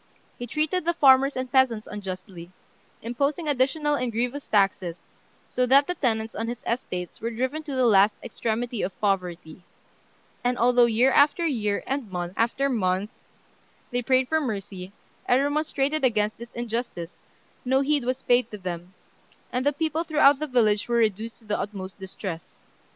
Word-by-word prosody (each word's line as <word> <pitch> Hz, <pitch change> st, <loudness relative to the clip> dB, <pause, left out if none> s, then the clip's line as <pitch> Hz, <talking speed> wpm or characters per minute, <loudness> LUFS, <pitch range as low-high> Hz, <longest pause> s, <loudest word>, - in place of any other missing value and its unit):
He 245 Hz, -, -5 dB
treated 310 Hz, +7 st, 0 dB
the 340 Hz, +1 st, 0 dB
farmers 270 Hz, -1 st, +5 dB
and 255 Hz, -1 st, -4 dB
peasants 245 Hz, -5 st, +3 dB
unjustly, 185 Hz, -3 st, -7 dB, 0.5 s
imposing 280 Hz, +7 st, -1 dB
additional 295 Hz, +2 st, +1 dB
and 250 Hz, -4 st, -1 dB
grievous 245 Hz, +5 st, -2 dB
taxes, 195 Hz, -4 st, +1 dB, 0.5 s
so 250 Hz, 0 st, 0 dB
that 275 Hz, +3 st, +6 dB
the 360 Hz, -, -2 dB
tenants 225 Hz, -8 st, -1 dB
on 225 Hz, +2 st, -3 dB
his 240 Hz, 0 st, -5 dB
estates 180 Hz, -7 st, -4 dB
were 230 Hz, -, -2 dB
driven 260 Hz, +7 st, -2 dB
to 295 Hz, -3 st, -6 dB
the 255 Hz, -1 st, +2 dB
last 205 Hz, -2 st, +5 dB
extremity 235 Hz, 0 st, -3 dB
of 190 Hz, -, -4 dB
poverty; 180 Hz, -5 st, -2 dB, 0.8 s
and 245 Hz, 0 st, +1 dB
although 245 Hz, 0 st, +5 dB
year 235 Hz, +4 st, +3 dB
after 295 Hz, +5 st, +4 dB
year, 210 Hz, -9 st, -1 dB
and 265 Hz, -7 st, -3 dB
month 175 Hz, -1 st, -4 dB
after 240 Hz, +4 st, +1 dB
month, 200 Hz, -4 st, 0 dB, 0.8 s
they 245 Hz, 0 st, 0 dB
prayed 255 Hz, +1 st, +2 dB
for 315 Hz, +2 st, +1 dB
mercy, 195 Hz, -6 st, -5 dB, 0.4 s
and 245 Hz, -, +4 dB
remonstrated 290 Hz, 0 st, 0 dB
against 215 Hz, -4 st, +1 dB
this 235 Hz, 0 st, -9 dB
injustice, 230 Hz, -7 st, -4 dB, 0.5 s
no 265 Hz, +2 st, +2 dB
heed 290 Hz, -1 st, +1 dB
was 255 Hz, +2 st, -2 dB
paid 245 Hz, +1 st, +3 dB
to 210 Hz, -, -7 dB
them, 180 Hz, -1 st, -6 dB, 0.6 s
and 250 Hz, +1 st, 0 dB
the -, -, +5 dB
people 315 Hz, +2 st, -1 dB
throughout 295 Hz, -4 st, +4 dB
the 305 Hz, -, -2 dB
villages 220 Hz, -5 st, +2 dB
were 240 Hz, -, 0 dB
reduced 225 Hz, 0 st, 0 dB
to 230 Hz, -, -21 dB
the 210 Hz, 0 st, -1 dB
utmost 195 Hz, -2 st, -6 dB
distress. 190 Hz, -3 st, -7 dB
240 Hz, 165 wpm, -25 LUFS, 205-270 Hz, 0.8 s, that